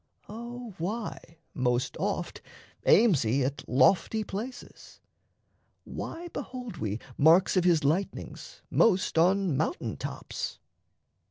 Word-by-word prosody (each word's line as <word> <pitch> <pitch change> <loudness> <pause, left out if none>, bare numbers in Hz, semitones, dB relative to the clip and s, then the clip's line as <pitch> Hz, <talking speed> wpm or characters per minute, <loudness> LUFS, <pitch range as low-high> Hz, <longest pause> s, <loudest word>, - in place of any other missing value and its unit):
O 235 +1 -8
why 190 -2 -5 0.2
most 125 -2 0
oft - - -2 0.5
Aims 205 - +6
he 125 +4 +1
at 140 +2 -3
lofty 185 - +3
places? 220 +6 -8 0.8
Why 345 +1 -6
behold 255 -6 -7
we 105 0 -3 0.2
Marks 165 +7 +5
of 180 -1 +3
his 170 -4 +4
lightnings 165 +8 -3
most 190 -6 +3
on 185 -1 +3
mountain 160 - -2
tops? - - -5
185 Hz, 105 wpm, -28 LUFS, 145-225 Hz, 0.8 s, Aims